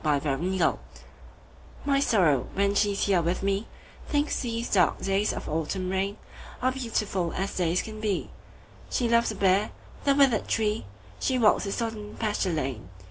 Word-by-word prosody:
My 150 -2 +3
November 150 +6 -1
Guest - - +2 1.1
MY 280 -1 +3
Sorrow, 165 - +3
when 200 +1 +2
she's 200 -1 +1
here 190 -4 +3
with 175 +3 -1
me, 200 +2 0 0.4
Thinks 290 0 0
these 235 -2 -2
dark 180 -4 +3
days 195 +2 +1
of - - -6
autumn 165 +4 -2
rainAre 200 +6 -3
beautiful 210 -8 -1
as 195 +1 -3
days 175 0 +1
can 215 -1 -8
be; 205 -4 -1 0.6
She 245 - 0
loves 235 0 +3
the 215 - -3
bare, 195 +1 +3 0.3
the 280 -1 +3
withered 270 -6 +3
tree; 215 - 0 0.3
She 260 - +1
walks 220 -3 +4
the 200 - -3
sodden 220 -2 -4
pasture 210 -4 0
lane. 130 - -3
200 Hz, 160 wpm, -27 LUFS, 180-225 Hz, 1.1 s, walks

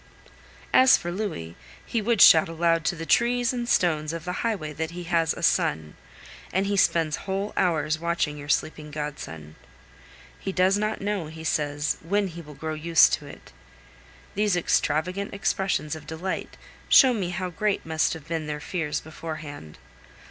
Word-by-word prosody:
As 260 0 +7
for 175 - -5
Louis, 175 - -4 0.3
he 230 - -1
would 225 -1 +1
shout 160 0 +7
aloud 165 0 +1
to 180 0 +1
the 165 0 -6
trees 240 +4 +2
and 240 -1 -3
stones 155 -3 +1
of 165 0 -6
the 180 - -2
highway 190 -10 -2
that 160 +2 -3
he 175 +1 -7
has 165 -2 +1
a - - -6
son; 75 0 +1 0.6
and 190 +2 +1
he 200 +1 0
spends 165 -5 +2
whole 195 +2 -2
hours 160 -3 +1
watching 170 -3 -1
your 145 0 -9
sleeping 150 +1 -1
godson. 145 - -7 0.8
He - - -4
does 190 +1 +3
not 215 +1 -2
know, 200 -5 -2
he 160 +1 -10
says, 150 -1 -1
when 200 +4 0
he 170 0 -9
will 150 -2 -12
grow 155 +3 -4
used 165 +2 +4
to - - -2
it. - - -13 0.8
These 210 -2 +1
extravagant 180 +4 0
expressions 185 -6 -1
of 155 -1 -11
delight 165 +4 -5 0.3
show 260 -3 +7
me 195 -6 -2
how 180 0 -3
great 205 +4 -1
must 160 0 +1
have 160 -2 -11
been 160 -2 -3
their 150 0 -4
fears 150 -2 -3
beforehand. 155 - -8
165 Hz, 170 wpm, -25 LUFS, 150-195 Hz, 0.8 s, As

